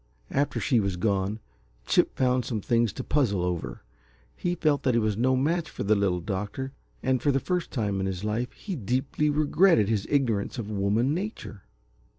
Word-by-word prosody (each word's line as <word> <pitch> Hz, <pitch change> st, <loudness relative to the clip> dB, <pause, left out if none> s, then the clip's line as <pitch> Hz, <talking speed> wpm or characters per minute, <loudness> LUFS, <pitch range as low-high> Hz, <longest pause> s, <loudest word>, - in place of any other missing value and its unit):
After 140 Hz, +2 st, 0 dB
she 125 Hz, -5 st, +2 dB
was 100 Hz, -3 st, -1 dB
gone, 100 Hz, +2 st, 0 dB, 0.5 s
Chip -, -, +2 dB
found 125 Hz, -1 st, +2 dB
some 115 Hz, -3 st, -2 dB
things 115 Hz, +1 st, +1 dB
to 130 Hz, -, -5 dB
puzzle 110 Hz, -13 st, +1 dB
over. 85 Hz, -9 st, -3 dB, 0.5 s
He 175 Hz, 0 st, -1 dB
felt 155 Hz, -4 st, +1 dB
that 125 Hz, -3 st, +1 dB
he -, -, +4 dB
was 110 Hz, -2 st, 0 dB
no 130 Hz, +4 st, +2 dB
match 160 Hz, +5 st, 0 dB
for -, -, -5 dB
the 105 Hz, +2 st, +3 dB
Little 95 Hz, -4 st, +1 dB
Doctor, 105 Hz, +8 st, -4 dB, 0.3 s
and 130 Hz, -2 st, +1 dB
for 145 Hz, -, +3 dB
the 135 Hz, -, +2 dB
first 180 Hz, +3 st, -2 dB
time 105 Hz, -6 st, -1 dB
in 95 Hz, -, -1 dB
his 95 Hz, 0 st, -4 dB
life 110 Hz, +4 st, -1 dB
he 195 Hz, -4 st, -6 dB
deeply 130 Hz, -, 0 dB
regretted 150 Hz, -, +4 dB
his 105 Hz, -3 st, 0 dB
ignorance 125 Hz, -7 st, 0 dB
of 110 Hz, -3 st, -4 dB
woman 105 Hz, +7 st, +1 dB
nature. 180 Hz, -, -5 dB
120 Hz, 185 wpm, -27 LUFS, 100-140 Hz, 0.5 s, he